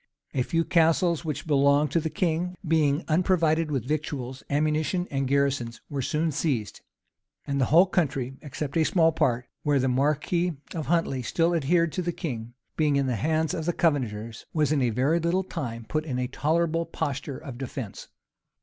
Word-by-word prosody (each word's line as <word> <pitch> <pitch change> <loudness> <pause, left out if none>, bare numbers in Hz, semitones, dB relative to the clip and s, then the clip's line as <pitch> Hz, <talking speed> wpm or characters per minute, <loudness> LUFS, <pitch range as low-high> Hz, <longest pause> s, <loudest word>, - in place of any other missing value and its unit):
A 130 - +1
few 165 +6 0
castles 165 0 +3
which 150 -2 -4
belonged 140 -1 +3
to 170 - +3
the 160 0 -2
king, 175 +2 -1
being 155 -1 +2
unprovided 165 -1 +2
with 135 -6 -1
victuals, 140 -4 -3
ammunition, 155 +4 0
and 135 -1 0
garrisons, 135 -4 0
were 140 -1 -1
soon 155 +5 0
seized. 135 -8 -2 0.6
And 140 -1 -1
the - - +4
whole 165 +8 +6
country, 140 -8 -1
except 145 -1 -5
a 160 - +4
small 165 0 +3
part, 125 -6 +1 0.2
where 145 -1 +2
the 130 0 +1
marquis 150 +7 +1 0.2
of 155 -6 -4
Huntley 165 -5 +1
still 165 +7 +1
adhered 165 +1 +2
to 185 - -2
the 175 0 -1
king, 120 -8 -5 0.2
being 150 -3 +2
in 140 -1 +2
the 125 -2 0
hands 155 +7 0
of 160 0 -3
the 175 - +2
Covenanters, 115 -10 -1
was 150 -2 +2
in 150 -3 +2
a 125 - +2
very 135 +9 +2
little 170 +3 +1
time 120 -11 -5
put 155 0 -1
in 135 -5 -3
a 125 - 0
tolerable 165 +5 0
posture 145 -4 -3
of 130 -5 -9
defence. 130 -5 -6
150 Hz, 180 wpm, -26 LUFS, 135-165 Hz, 0.6 s, whole